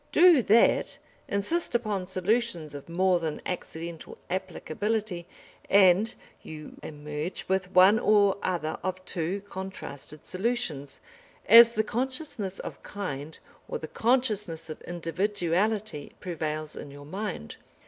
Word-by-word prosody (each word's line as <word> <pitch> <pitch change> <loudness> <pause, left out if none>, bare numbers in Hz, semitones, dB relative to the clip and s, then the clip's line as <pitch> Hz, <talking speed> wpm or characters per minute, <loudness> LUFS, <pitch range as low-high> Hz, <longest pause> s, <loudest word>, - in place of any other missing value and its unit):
Do 345 -6 +7
that, 225 +1 +4 0.3
insist 240 +10 -1
upon 210 -6 -1
solutions 185 -4 0
of 145 +2 -9
more 180 +1 +3
than 160 -2 -3
accidental 170 -2 -6
applicability, 190 +1 -2 0.4
and 200 +3 +5 0.3
you 155 -1 -9
emerge 150 +3 -5
with 190 -1 0
one 190 +4 +7
or 205 -3 +4
other 165 -4 -2
of 185 0 -4
two 180 +4 -2
contrasted 190 -7 -8
solutions, 185 - -3 0.4
as 235 0 +9
the 220 - +1
consciousness 245 - -3
of - - -7
kind 160 -7 -5 0.3
or - - -3
the 155 - -7
consciousness 210 -10 0
of - - -8
individuality 180 +1 -1
prevails 155 -3 -3
in 145 - -8
your 145 +1 -11
mind. 185 - -5
185 Hz, 120 wpm, -28 LUFS, 160-215 Hz, 0.4 s, as